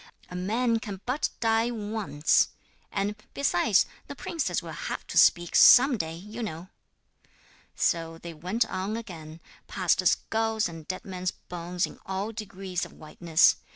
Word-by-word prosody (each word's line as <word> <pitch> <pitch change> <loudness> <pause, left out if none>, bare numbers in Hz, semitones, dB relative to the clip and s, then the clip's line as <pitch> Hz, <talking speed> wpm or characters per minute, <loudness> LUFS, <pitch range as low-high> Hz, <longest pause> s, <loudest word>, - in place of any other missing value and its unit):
'A - - -6
man 225 +6 +1
can 205 -3 -6
but 255 +5 0
die 225 +1 +2
once. 210 -9 +1 0.4
And, 205 +1 -1 0.2
besides, 215 -6 +3 0.2
the 285 - -7
princess 325 +3 -2
will - - -7
have - - -5
to - - -8
speak 175 -1 +4
some 255 +1 +8
day, 160 -6 -3
you 210 +7 -8
know.' 175 -4 -5 1.1
So 165 -1 0
they 170 0 -8
went 185 +9 0
on 205 +1 -3
again, 165 -8 -9 0.3
past - - +1
skulls 225 0 +1
and 165 -2 -10
dead 185 - -5
men's 185 -1 -3
bones 175 +1 -3
in - - -12
all 195 +3 -3
degrees 195 -4 -5
of - - -7
whiteness. 160 +1 +3
195 Hz, 150 wpm, -27 LUFS, 175-225 Hz, 1.1 s, some